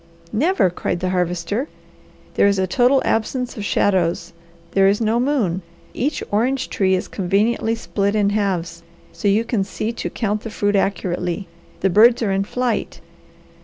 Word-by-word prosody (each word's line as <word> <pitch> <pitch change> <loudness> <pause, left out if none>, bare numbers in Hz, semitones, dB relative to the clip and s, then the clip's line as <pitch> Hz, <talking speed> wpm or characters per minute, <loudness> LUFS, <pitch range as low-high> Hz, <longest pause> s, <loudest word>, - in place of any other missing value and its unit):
"Never!" 285 - +2
cried 175 0 -3
the 185 0 -1
Harvester. 180 - -1 0.7
"There - - +4
is 200 -1 +2
a 190 - +1
total 250 +7 +3
absence 250 +3 -1
of 210 - -5
shadows. 185 -4 +1 0.4
There 195 0 +4
is 200 +1 +2
no 225 +1 +1
moon. 240 - 0 0.3
Each 285 +4 -2
orange 255 +6 0
tree 190 -1 +2
is 185 - -3
conveniently 215 +4 0
split 200 -2 -1
in 205 -1 +2
halves, 180 -5 -1 0.3
so 170 +5 -2
you 205 +3 +3
can 225 -4 0
see 210 +3 -3
to - - -4
count 210 -2 -2
the 225 - -6
fruit 205 -1 0
accurately; 185 -1 -1 0.3
the 195 - +2
birds 230 +5 +5
are 205 - 0
in 195 0 0
flight. 250 +1 -2
205 Hz, 165 wpm, -20 LUFS, 190-230 Hz, 0.7 s, birds